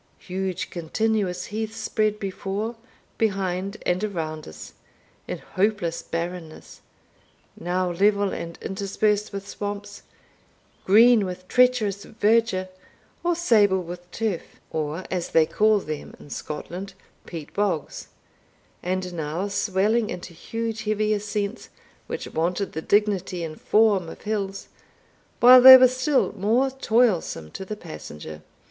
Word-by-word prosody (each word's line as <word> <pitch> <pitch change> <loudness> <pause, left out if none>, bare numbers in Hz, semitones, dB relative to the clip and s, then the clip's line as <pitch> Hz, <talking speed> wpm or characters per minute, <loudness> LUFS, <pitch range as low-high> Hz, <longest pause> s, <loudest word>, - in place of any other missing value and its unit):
Huge 185 -1 -4
continuous 180 +1 -1
heaths 220 +1 -4
spread 215 -1 0
before, 200 +3 -4 0.4
behind, 195 -2 -1
and 180 +3 0
around 160 -6 -4
us, 80 - -10 0.5
in - - -3
hopeless 190 -4 -1
barrenness 170 -1 -6 0.7
now 180 +1 -1
level 200 +2 +2
and 170 0 -6
interspersed 205 +2 -1
with 200 -1 -6
swamps, 205 0 -6 0.8
green 225 +3 +6
with 185 -1 -6
treacherous 240 -6 +2
verdure, 215 -4 +1 0.5
or 350 0 +2
sable 210 - +3
with 175 +1 -9
turf, 200 -2 -4
or, 155 +3 -3
as 180 -2 -2
they 160 -1 +4
call 215 +6 +3
them 155 -6 -6
in 145 - -14
Scotland, 180 +5 -6 0.3
peat 160 -4 -8
bogs, 200 -8 -2 0.7
and 185 0 -2
now 165 +4 -3
swelling 205 +3 +1
into 175 0 -7
huge 225 +5 -4
heavy 215 0 +1
ascents, 205 +1 -3 0.4
which - - -5
wanted 180 +5 -1
the 160 - -3
dignity 195 -3 +1
and 155 -1 -7
form 210 -6 +3
of - - -11
hills, 200 -2 -3 0.7
while 250 +1 +9
they 260 +1 +13
were 255 0 +7
still 255 +3 +1
more 230 +7 +2
toilsome 220 - +1
to - - -6
the 210 +2 -6
passenger. 75 - -9
200 Hz, 125 wpm, -24 LUFS, 180-215 Hz, 0.8 s, they